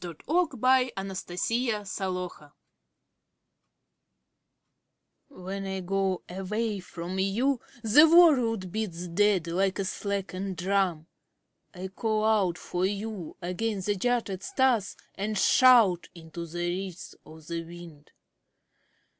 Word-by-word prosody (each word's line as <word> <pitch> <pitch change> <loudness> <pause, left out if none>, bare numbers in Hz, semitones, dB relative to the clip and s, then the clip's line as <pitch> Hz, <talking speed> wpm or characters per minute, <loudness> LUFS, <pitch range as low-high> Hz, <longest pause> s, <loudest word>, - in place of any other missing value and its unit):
Dearest 170 -3 -8
of 315 -4 +1
my 255 +1 +3
Heart! 195 0 -4 0.2
The 225 +4 -1
Taxi 180 -6 -5 2.7
When 195 -5 -6
I 190 0 -3
go 190 0 -1
away 205 +3 -3
from 180 +1 -6
you 235 +8 +1 0.2
The 295 +9 +7
world 250 - +5
beats 180 -5 -4
dead 195 0 +2
Like 185 +3 0
a 195 - -1
slackened 195 -1 -3
drum. 180 -3 0 0.7
I 185 +1 -6
call 215 +2 -1
out 200 -6 +2
for 180 0 -3
you 205 -3 -5
against 190 +2 -2
the 205 - +1
jutted 215 -3 -1
stars 245 -4 +1 0.2
And 210 +2 -3
shout 225 -6 +5
into 170 0 -8
the 175 +2 -3
ridges 180 0 -5
of 160 0 -14
the 170 +1 -4
wind. 165 -3 -12
195 Hz, 115 wpm, -28 LUFS, 180-220 Hz, 2.7 s, The